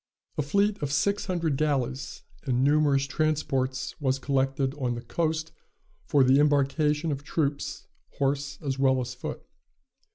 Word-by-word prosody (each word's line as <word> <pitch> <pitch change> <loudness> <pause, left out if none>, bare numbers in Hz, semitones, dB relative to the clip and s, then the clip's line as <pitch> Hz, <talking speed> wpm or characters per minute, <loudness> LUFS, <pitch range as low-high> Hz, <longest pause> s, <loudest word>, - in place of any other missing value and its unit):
A - - 0
fleet 200 +7 +1
of 145 -2 -2
six 200 +9 +1
hundred 165 -6 0
galleys 135 -2 -1 0.2
and 130 -2 0
numerous 145 -1 +3
transports 140 -3 -1
was 135 -1 +1
collected 135 0 0
on 125 -3 0
the 120 - -7
coast 160 -1 -1 0.6
for 145 -3 +4
the 130 +2 +5
embarkation 150 +2 +2
of 140 0 -4
troops, 145 -1 -2 0.3
horse 140 0 -1
as 135 -2 -2
well 130 -1 +4
as 125 0 -4
foot. 125 - -6
140 Hz, 140 wpm, -27 LUFS, 135-150 Hz, 0.6 s, the